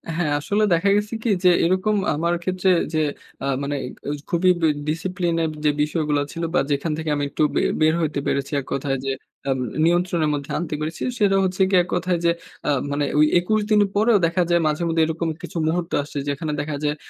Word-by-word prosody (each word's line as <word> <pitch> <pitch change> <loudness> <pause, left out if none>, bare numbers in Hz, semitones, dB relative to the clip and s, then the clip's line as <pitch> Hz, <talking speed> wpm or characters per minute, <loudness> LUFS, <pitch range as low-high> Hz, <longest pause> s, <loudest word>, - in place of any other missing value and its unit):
হ্যাঁ, 165 -3 0
আসলে 205 +8 0
দেখা 170 +4 +2
গেছে 210 +2 -1
কি? 235 - 0
যে 180 - +7 0.2
এরকম 185 +5 +1 0.2
আমার 170 +3 0
ক্ষেত্রে 185 +1 0 0.2
যে 155 - +1 0.4
আ - - -1 0.2
মানে 145 +1 -2
এ - - -5 0.2
এই 145 - -2
খুবই 175 +2 +2 0.2
এ - - +4 0.2
ডিসিপ্লিনের 170 0 -1 0.2
যে - - +5
বিষয়গুলা 150 -2 0
ছিল 165 - -5
বা, - - +4
যেখান 145 +3 0
থেকে 160 -1 -3
আমি 145 - -1
একটু 155 - 0
বে - - +3 0.2
বের 155 0 +4
হইতে 150 -3 -1
পেরেছি 140 0 -1
এককথায় 135 +1 -2
যে 135 - 0 0.4
আব 135 - +1 0.3
নিয়ন্ত্রণের 175 -2 +2
মধ্যে 140 -1 -4
আনতে 165 -1 -3
পেরেছি, 155 +2 -4 0.2
সেটা 200 -2 +3
হচ্ছে 190 0 -1
গিয়ে 185 - +5
এককথায় 175 0 -1
যে 170 - +5 0.4
আ - - +2 0.2
মানে 145 0 0
ওই 150 - +7
২১ 215 +5 +1
দিন 215 - +5 0.2
পরেও 220 +2 +4
দেখা 170 +2 +1
যায় 175 0 +4
মাঝে 155 +3 -1
মধ্যে 165 0 +1
এরকম 165 +1 -2
কিছু - - -6
মুহূর্ত 170 +1 -1
আসছে, 145 - -8
যেখানে 145 +2 -2
দেখা 145 0 -4
যায় 150 0 0
165 Hz, 205 wpm, -22 LUFS, 150-180 Hz, 0.4 s, যে